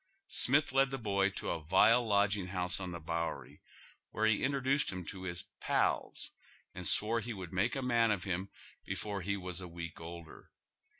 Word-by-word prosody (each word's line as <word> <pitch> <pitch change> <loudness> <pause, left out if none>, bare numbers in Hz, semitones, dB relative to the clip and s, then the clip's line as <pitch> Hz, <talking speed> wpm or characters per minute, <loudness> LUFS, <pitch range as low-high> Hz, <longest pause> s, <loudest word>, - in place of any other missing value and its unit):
Smith 140 +3 +4
led 135 +1 +4
the 135 - -3
boy 100 -4 +1
to 100 - -4
a 80 - -3
vile 95 +9 +5
lodging 100 -3 +2
house 90 +1 -1
on 95 -1 -4
tlie 85 -3 -8
Bowery, 85 0 -3 0.5
where 110 - 0
he 110 -1 +3
introdnced 140 0 +1
him 90 -2 -6
to 95 +1 -7
his 85 -1 -4
' - - -57
pals - - +1 0.2
' - - -31
and 90 -1 -4
swore 115 +2 +3
he 115 +2 -5
would 95 -2 -8
make 100 +6 +1
a 135 - -2
man 120 -2 +3
of 100 -4 0
him 95 +1 -2 0.3
before 100 -2 -4
he 100 +2 -1
was 90 -1 -3
a 90 - -6
week 85 -1 -7
older. 85 -1 -10
100 Hz, 195 wpm, -33 LUFS, 90-115 Hz, 0.5 s, vile